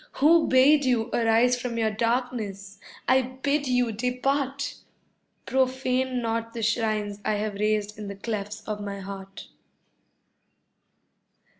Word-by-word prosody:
Who 320 Hz, +3 st, +4 dB
bade 280 Hz, +3 st, +5 dB
you 245 Hz, -3 st, +1 dB
arise 235 Hz, +2 st, +3 dB
from 240 Hz, -2 st, -3 dB
your 220 Hz, -1 st, +1 dB
darkness? 220 Hz, -4 st, -2 dB, 0.3 s
I 260 Hz, +1 st, +5 dB
bid 270 Hz, +3 st, -2 dB
you 250 Hz, -2 st, +2 dB
depart! 270 Hz, +4 st, -1 dB, 0.7 s
Profane 260 Hz, -1 st, 0 dB
not 230 Hz, 0 st, -2 dB
the 230 Hz, -, -3 dB
shrines 215 Hz, -2 st, 0 dB
I -, -, +1 dB
have 210 Hz, 0 st, -2 dB
raised 210 Hz, 0 st, 0 dB
in 210 Hz, -, -6 dB
the 200 Hz, -, -6 dB
clefts 210 Hz, 0 st, -5 dB
of 210 Hz, -1 st, -3 dB
my 200 Hz, -1 st, -5 dB
heart. 195 Hz, 0 st, -9 dB
230 Hz, 125 wpm, -26 LUFS, 210-255 Hz, 0.7 s, bade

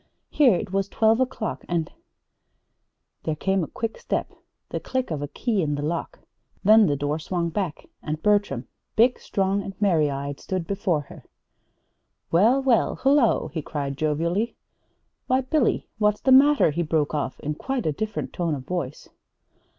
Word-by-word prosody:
Here 260 Hz, -9 st, +5 dB
it 180 Hz, -, -4 dB
was 195 Hz, 0 st, 0 dB
twelve 225 Hz, +1 st, +3 dB
o'clock, 250 Hz, -4 st, -2 dB
and 170 Hz, -2 st, -1 dB, 1.3 s
There 155 Hz, -, -2 dB
came 190 Hz, +3 st, 0 dB
a -, -, -4 dB
quick 225 Hz, 0 st, -4 dB
step, -, -, -3 dB, 0.4 s
the -, -, -3 dB
click 260 Hz, -6 st, -3 dB
of 150 Hz, -3 st, -2 dB
a 145 Hz, -, -3 dB
key 220 Hz, -, -1 dB
in 150 Hz, -3 st, 0 dB
the 145 Hz, -, -4 dB
lock, 165 Hz, +3 st, -3 dB, 0.5 s
then 215 Hz, +1 st, +7 dB
the 145 Hz, -, +1 dB
door 145 Hz, +2 st, -2 dB
swung 170 Hz, +1 st, -2 dB
back 170 Hz, -2 st, -3 dB, 0.2 s
and 155 Hz, 0 st, -3 dB
Bertram, 205 Hz, -, +1 dB, 0.3 s
big, 245 Hz, +3 st, +4 dB
strong, 195 Hz, 0 st, 0 dB
and 195 Hz, -1 st, -8 dB
merry 170 Hz, -8 st, +3 dB
eyed, 140 Hz, 0 st, -4 dB
stood 185 Hz, -3 st, -3 dB
before 185 Hz, -5 st, 0 dB
her. 140 Hz, -, -13 dB, 1.1 s
"Well, 230 Hz, +11 st, +4 dB
well, 250 Hz, -4 st, +3 dB
hullo," 270 Hz, -3 st, +3 dB
he 160 Hz, -, -4 dB
called 140 Hz, -2 st, -4 dB
jovially. 165 Hz, -, 0 dB, 0.7 s
"Why, 260 Hz, +1 st, +3 dB
Billy, 265 Hz, 0 st, +1 dB
what's 210 Hz, -1 st, +2 dB
the 265 Hz, -, +2 dB
matter?" 275 Hz, -, +6 dB
he 165 Hz, +4 st, -1 dB
broke 155 Hz, -2 st, 0 dB
off, 145 Hz, -3 st, -2 dB
in 150 Hz, -, -3 dB
quite 260 Hz, -, -3 dB
a 155 Hz, -, +2 dB
different 215 Hz, +7 st, -4 dB
tone 170 Hz, -4 st, -1 dB
of 130 Hz, -2 st, -8 dB
voice. 150 Hz, -5 st, -4 dB
185 Hz, 165 wpm, -24 LUFS, 150-220 Hz, 1.3 s, then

